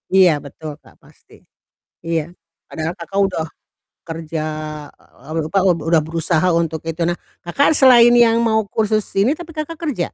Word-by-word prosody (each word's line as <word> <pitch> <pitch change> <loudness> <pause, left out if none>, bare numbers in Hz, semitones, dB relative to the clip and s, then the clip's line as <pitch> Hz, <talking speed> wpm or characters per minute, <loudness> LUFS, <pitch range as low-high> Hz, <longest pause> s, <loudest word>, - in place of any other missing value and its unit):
Iya, 185 -2 +7
betul 150 +2 -9
Kak, - - -21
pasti. - - -21 0.6
Iya, 165 0 -2 0.3
padahal 160 +1 -4
Kakak 175 +3 -4
udah 160 -4 -3 0.6
kerja, 165 -1 -5 0.5
eee, 130 - -25 0.2
apa, 200 - -1
eee, 175 -4 +2
udah 165 -2 +4
berusaha 165 +1 0
untuk 165 -1 -1
itu. 165 +1 -4
Nah, 175 +1 -1 0.2
Kakak 275 - +2
selain 245 -4 +6
yang 235 -1 +5
mau 220 -1 +2
kursus 215 -1 +1 0.2
ini 215 +8 +3
tapi 330 +1 -10
Kakak 310 +2 -4
kerja? 250 - -3
175 Hz, 155 wpm, -19 LUFS, 165-230 Hz, 0.6 s, Iya